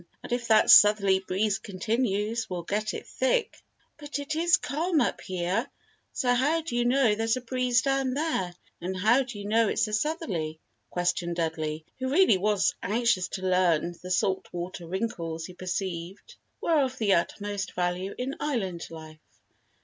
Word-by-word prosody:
"And - - -9
if 240 0 -1
that 220 -1 +5
southerly 200 -2 +7
breeze 195 +2 -1
continues 215 +2 -1
we'll 180 -2 -4
get 210 +4 -2
it - - -7
thick." 260 - -1 0.4
"But 295 0 -5
it 285 +2 -4
is 330 -1 +4
calm 315 +3 0
up - - 0
here, 180 0 -2 0.4
so 245 -1 +1
how 290 +7 +2
do 310 -7 -5
you 240 0 +1
know 250 -3 +4
there's 225 +3 0
a - - -5
breeze 250 -1 +1
down 270 -1 0
there 290 - -1 0.3
and 185 +2 -3
how 220 +8 +4
do 250 -4 -6
you 200 - -7
know 225 +1 +3
it's 215 - +1
a 215 - -6
southerly?" 210 - -2 0.3
questioned 175 -1 -1
Dudley, 160 -2 -2
who 260 0 -2
really 295 - +4
was 205 0 +2
anxious 210 -3 +1
to 190 - -6
learn 175 -3 +2
the 180 - -8
"salt 190 +1 0
water" 175 0 -6
wrinkles 170 -4 -3
he 180 - -9
perceived 185 - -5 0.2
were 320 -3 +2
of 260 -1 -2
the 210 -4 +2
utmost 205 +3 -2
value 180 +2 -2
in 260 +2 -3
Island 195 - -2
life. 155 -1 -11
210 Hz, 170 wpm, -27 LUFS, 180-255 Hz, 0.4 s, southerly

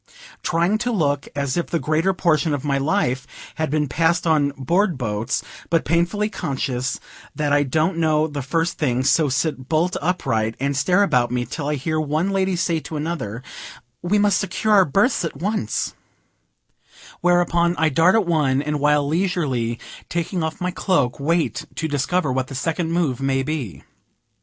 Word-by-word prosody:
Trying 170 +6 +1
to 245 +1 -1
look 145 -9 0
as 140 +1 -1
if 175 - -1
the 170 - -1
greater 160 +4 +1
portion 160 -5 +1
of 145 +1 -6
my 140 -1 +1
life 135 -5 0 0.3
had 155 - 0
been 150 0 0
passed 165 +6 +1
on 155 -3 +3
board 175 +6 +1
boats, 110 -1 -2 0.3
but 165 -1 +1
painfully 175 +5 +1
conscious 135 - -3 0.4
that 145 -1 0
I 145 - +4
don't 155 +5 0
know 155 -1 +3
the 145 -2 -4
first 165 +5 -1
thing; 130 -4 +1
so 145 +2 +3
sit 135 -1 -2
bolt 165 +3 +1
upright, 115 -10 0
and 140 +1 -1
stare 180 +8 +3
about 125 -11 +2
me 125 0 -1
till 140 +4 -5
I 150 - 0
hear 155 +3 -2
one 155 +5 0
lady 190 -1 +1
say 170 -2 0
to 155 0 -6
another 145 -8 -4 0.6
"We 180 +4 +1
must 205 -1 +3
secure 215 +2 0
our 195 -2 +6
berths 200 - +2
at 165 - -4
once;" 200 - -2 1.3
whereupon 175 -1 +2
I 160 -1 +3
dart 165 +7 +4
at 220 -3 +3
one, 150 -6 +2
and, 150 0 -2
while 145 0 +3
leisurely 150 -9 0 0.3
taking 175 +1 -2
off 160 +2 -3
my 180 0 -1
cloak, 145 -10 0
wait 165 +3 0
to 160 - -2
discover 145 +2 0
what 130 0 -1
the 135 - -8
second 165 +4 -1
move 155 -7 0
may 135 0 +1
be. 135 - -4
155 Hz, 175 wpm, -22 LUFS, 140-175 Hz, 1.3 s, our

